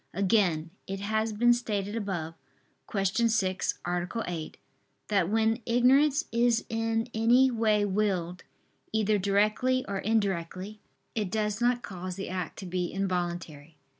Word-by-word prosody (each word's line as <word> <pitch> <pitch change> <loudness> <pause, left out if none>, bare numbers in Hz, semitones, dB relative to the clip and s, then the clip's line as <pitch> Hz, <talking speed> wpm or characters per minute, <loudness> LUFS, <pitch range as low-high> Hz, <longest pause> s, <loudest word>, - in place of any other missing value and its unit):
Again, 180 -5 +2 0.2
it 195 0 -4
has 220 +2 0
been 240 +3 +4
stated 210 -4 -2
above 185 -7 -3 0.6
(Q. 195 -2 0
6, 200 -2 +1
A. 175 0 -1 0.2
8) 165 -3 -5 0.5
that 195 -4 +2
when 225 +2 +1
ignorance 270 +5 +4
is 235 0 +2
in 225 +1 -1
any 245 +4 +4
way 215 -3 +2
willed, 185 -3 -1 0.5
either 215 -1 +2
directly 215 +6 +2
or 200 -1 -2
indirectly, 200 -1 -1 0.3
it 210 -4 -2
does 210 +2 -1
not 245 0 +2
cause 185 -1 -6
the 195 - -5
act 180 -2 -4
to 195 - -7
be 180 0 -2
involuntary. 175 -5 -3
205 Hz, 135 wpm, -28 LUFS, 185-225 Hz, 0.6 s, been